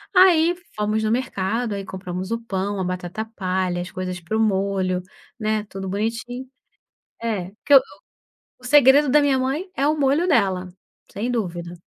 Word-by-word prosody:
Aí 350 -2 +6 0.2
fomos 215 +1 0
no 215 - +1
mercado 230 -2 -1
aí 195 -1 -4
compramos 185 +1 -6
o 230 - 0
pão, 200 -2 -3
a - - 0
batata 180 +4 -4
palha, 185 -2 -1
as 180 - -7
coisas 185 -1 -4
para 195 +6 -3
o - - 0
molho, 190 -3 +1 0.4
né, 215 0 -1
tudo 190 -1 -6
bonitinho. 230 +5 -3 0.8
É, 195 -5 -2
que 285 - +3
o 260 - +8 0.8
segredo 280 +1 +6
da 300 +2 +5
minha 280 -2 +3
mãe 290 +9 -2
é 280 +2 +1
o 305 +1 +1
molho 290 +5 +2
dela, 190 - +2 0.4
sem 230 +5 -3
dúvida. 175 -6 -3
215 Hz, 160 wpm, -22 LUFS, 185-260 Hz, 0.8 s, o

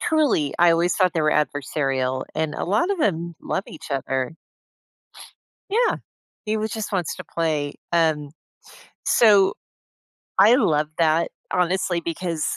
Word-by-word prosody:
Truly, 295 - +1
I 175 0 +6
always 170 +1 +2
thought 185 -3 +3
they 165 - 0
were 155 0 +2
adversarial, 135 -3 -1
and 155 -1 -1
a - - -3
lot 210 - +1
of 400 - 0
them 170 - -1
love 195 - -2
each 155 - -11
other. 135 -1 -2 1.4
Yeah. 465 +4 +2 0.5
He 215 +1 0
was 215 -1 -3
just 220 -2 -4
wants 180 -4 -1
to - - -8
play. 155 -3 -2 0.2
Um, 155 -4 +1 0.7
so, 205 -4 +5 0.9
I 235 +3 +7
love 155 - +2
that, 165 0 +2 0.2
honestly, 180 -1 +1
because, 165 -1 -3
165 Hz, 140 wpm, -23 LUFS, 150-195 Hz, 1.4 s, I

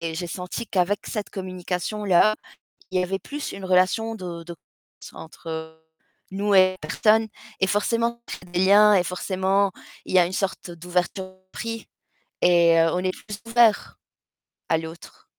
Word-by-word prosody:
et 165 -1 -4
j'ai 175 +2 -4
senti 180 +6 -5
qu'avec 195 +1 0
cette 210 -2 -4
communication 185 +2 -4
là, 200 +2 +5 0.6
il 185 - +1
y - - +1
avait 190 +2 -2
plus 290 +6 -6
une 195 -1 -8
relation 190 +5 +2
de 175 -4 -7
de 170 +1 -8
confiance 170 - -18
entre 160 0 -8 0.5
nous 200 +1 +1
et 185 0 +5
les 155 - -8
personnes 220 +4 +3 0.3
et 190 - +2
forcément 230 +4 0
ça - - -5
crée - - -16
des 175 - -1
liens 210 +2 +7
et 180 - +3
forcément, 190 +2 0 0.3
il - - -7
y - - +8
a 175 - +5
une 180 - -5
sorte 190 -2 -3
d'ouverture 180 +2 -2 0.3
d'esprit 225 0 -5 0.5
et 170 -1 +5
heu, 165 0 +4
on 180 - 0
est 185 0 0
plus 205 +2 -9
ouverts 230 -2 +3 0.7
à 160 - +3
l'autre. 160 +1 -10
185 Hz, 170 wpm, -24 LUFS, 175-205 Hz, 0.7 s, y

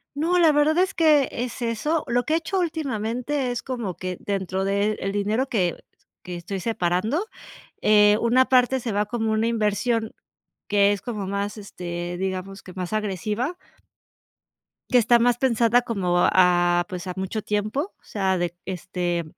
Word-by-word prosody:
No, 340 +4 +1
la 325 -2 +6
verdad 295 +2 +3
es 375 +1 +2
que 305 -5 +4
es 245 +1 -5
eso. 290 +8 -1
Lo 245 +1 +1
que 310 - -1
he - - +4
hecho 370 +3 -2
últimamente 265 -4 -2
es 245 - -3
como 235 -9 -4
que, 185 -1 -5
dentro 190 -1 -2
de 200 +2 +1
el 195 - -2
dinero 210 +6 0
que 185 -9 0 0.5
que 180 -1 -7
estoy 180 +3 -5
separando, 220 - 0 0.6
eh, 210 0 +5
una 250 +3 +4
parte 255 0 +4
se 230 - -3
va 205 +1 +1
como 225 0 -2
una 220 +1 +1
inversión 220 0 0 0.6
que 205 0 +4
es 200 -1 -4
como 210 -5 -4
más, 200 +2 -3
este, 175 -3 -6
digamos, 190 +1 -4
que 185 - -11
más 180 +1 -5
agresiva. 215 - -2 1.4
Que 250 - +6
está 240 0 +5
más 240 0 +3
pensada 240 -1 +3
como, 190 -7 -1
ah, 175 -1 +4
pues, 180 0 -6
a 180 - -4
mucho 190 +3 -3
tiempo 215 - -2
o - - -39
sea, 190 -3 -1
de 175 -1 -2
este, 175 -1 -2
215 Hz, 165 wpm, -24 LUFS, 190-245 Hz, 1.4 s, la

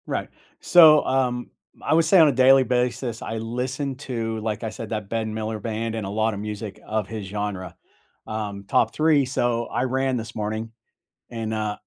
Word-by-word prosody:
Right. - - -3 0.3
So, 155 -4 +7
um, 125 -2 0 0.3
I - - 0
would 165 0 +4
say 180 +4 +5
on 160 - +8
a - - +4
daily 130 +1 +6
basis, 125 -2 -1
I 110 - -4
listened 125 +4 -3
to, 115 -5 -3
like 110 -1 -3
I 110 - -2
said, 110 0 -7
The 110 - -1
Ben 110 +1 -4
Miller 110 0 -3
Band 115 +1 -3
and 110 -3 -3
a - - -4
lotta 110 +1 0
music 105 0 -6
of 110 -2 -2
his 110 -3 -6
genre, 95 -3 -4 0.5
um, 105 -2 -5
top 110 - +2
3, 155 -3 +3
so, 120 -2 0
I 120 - -1
ran 130 0 0
this 110 -1 -7
morning, 110 +1 -3 0.6
and, 115 -2 -4
uh, 105 -1 -2
115 Hz, 185 wpm, -24 LUFS, 110-130 Hz, 0.6 s, on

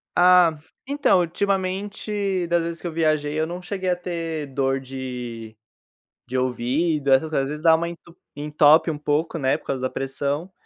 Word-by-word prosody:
Ah, 180 -3 +6 0.3
então, 280 -8 +3
ultimamente, 195 +1 -1
das 170 0 +1
vezes 165 0 -5
que - - -4
eu - - -4
viajei, 155 -2 0
eu 160 - 0
não 175 +2 -6
cheguei 185 0 -3
a 180 - +2
ter 165 -4 -4
dor 135 0 +1
de 125 -4 -7 0.7
de 130 - -3
ouvido, 135 +4 0
essas 135 +4 +4
coisas, 145 -3 0
às 135 - -4
vezes 150 +1 -6
dá 165 -1 +7
uma 170 +1 -1
en 170 - -8 0.4
entope 150 +2 +4
um 155 - -2
pouco, 150 +3 -1
né, 135 -4 +1
por - - -21
causa 135 -2 -2
da 130 - -1
pressão. 140 +5 -3
160 Hz, 180 wpm, -23 LUFS, 135-175 Hz, 0.7 s, dá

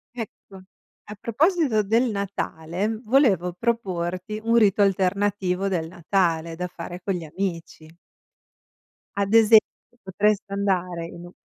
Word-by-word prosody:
Ecco, 220 -4 -9 0.6
a - - -6
proposito 275 - +2
del 230 +5 +2
Natale, 200 0 -3
volevo 215 - +3
proporti 185 -2 -2
un 230 +1 +2
rito 205 -2 +4
alternativo 195 0 +1
del 170 -4 -1
Natale, 170 -1 -1
da 180 +2 -3
fare 175 0 -8
con 195 - -1
gli 175 - -4
amici. 165 -1 -5 1.3
Ad 200 +1 0
esempio, 225 0 +8 0.4
potreste 200 +1 0
andare 180 -4 -1
in 170 +1 -10
un 175 - -12
195 Hz, 120 wpm, -24 LUFS, 175-215 Hz, 1.3 s, esempio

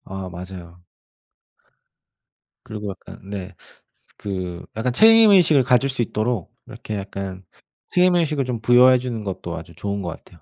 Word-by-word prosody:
아 95 -1 -7
맞아요. 90 -1 -10 1.8
그리고 105 -1 -6
약간 95 - -13
네 100 -2 -7 0.6
그 90 -3 -5
약간 120 +2 -1
책임의식을 200 - +6
가질 125 +2 +2
수 130 -2 -2
있도록 110 -1 -3
이렇게 115 -3 -8
약간 95 -1 -6 0.4
책임의식을 170 -6 +2
좀 120 -3 -4
부여해 125 +2 +6
주는 120 -3 -5
것도 95 -2 -5
아주 - - -10
좋은 100 0 -4
것 85 - -4
같아요. 85 0 -13
110 Hz, 290 characters per minute, -21 LUFS, 95-130 Hz, 1.8 s, 책임의식을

